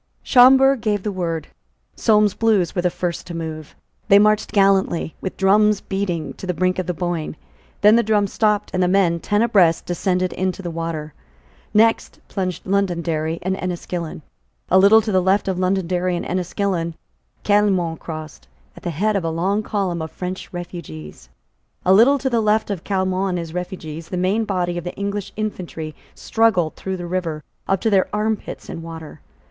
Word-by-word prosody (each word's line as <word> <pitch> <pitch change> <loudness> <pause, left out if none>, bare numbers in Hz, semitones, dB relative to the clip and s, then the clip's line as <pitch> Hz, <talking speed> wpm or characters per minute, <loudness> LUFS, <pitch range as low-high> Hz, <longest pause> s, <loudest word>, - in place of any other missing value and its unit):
Schomberg 265 0 +6
gave 210 -3 0
the 210 - -2
word. 165 -4 -3 0.5
Solmes's 210 -3 +3
Blues 210 -7 +1
were 180 - 0
the 180 - +2
first 175 -1 -4
to 170 - -6
move. 155 -2 -6 0.3
They 200 -1 +7
marched 215 +1 +3
gallantly, 195 -5 +2
with 190 - -5
drums 210 +2 +4
beating, 190 -5 -3
to 190 - -7
the 180 - -1
brink 185 +2 0
of 185 - -3
the 180 - -1
Boyne. 175 -3 -3 0.5
Then 210 +2 +7
the - - +5
drums 210 -3 +1
stopped; 210 -2 +1
and 185 - 0
the 180 - +3
men, 180 -3 +2
ten 205 +5 +1
abreast, 180 -8 +3
descended 180 +1 -1
into 185 +1 -2
the 175 - -4
water. 165 -2 -4 0.6
Next 225 +2 +2
plunged 185 -3 -3
Londonderry 170 -5 -1
and 190 +1 0
Enniskillen. 175 -3 -5 0.5
A 185 - +6
little 205 +3 +7
to 215 0 -3
the 185 -1 +3
left 190 +2 +2
of 185 -2 -1
Londonderry 185 -1 0
and 175 - -4
Enniskillen, 180 -2 -2 0.5
Caillemot 195 -6 +2
crossed, 155 - -8 0.3
at - - -13
the - - -3
head 205 +7 0
of 195 - 0
a 165 - -1
long 185 +6 0
column 195 -6 -2
of 160 - -4
French 180 +4 -6
refugees. 80 - -8 0.6
A 185 - +5
little 245 +8 +6
to 270 - -3
the 235 -3 +1
left 215 0 +1
of 185 -5 -4
Caillemot 190 -1 0
and 180 - -1
his 165 -2 -6
refugees, 165 -3 -6
the 180 - -3
main 195 +5 +1
body 175 -3 -1
of - - -9
the 175 - -6
English 200 0 -4
infantry 180 -7 -5 0.2
struggled 215 -8 +1
through 190 -1 -4
the 175 - -6
river, 170 -4 -3 0.2
up 195 -1 +1
to 225 - +1
their 190 -2 +3
armpits 215 0 -3
in 165 - -6
water. 165 -2 -9
185 Hz, 180 wpm, -21 LUFS, 170-205 Hz, 0.6 s, They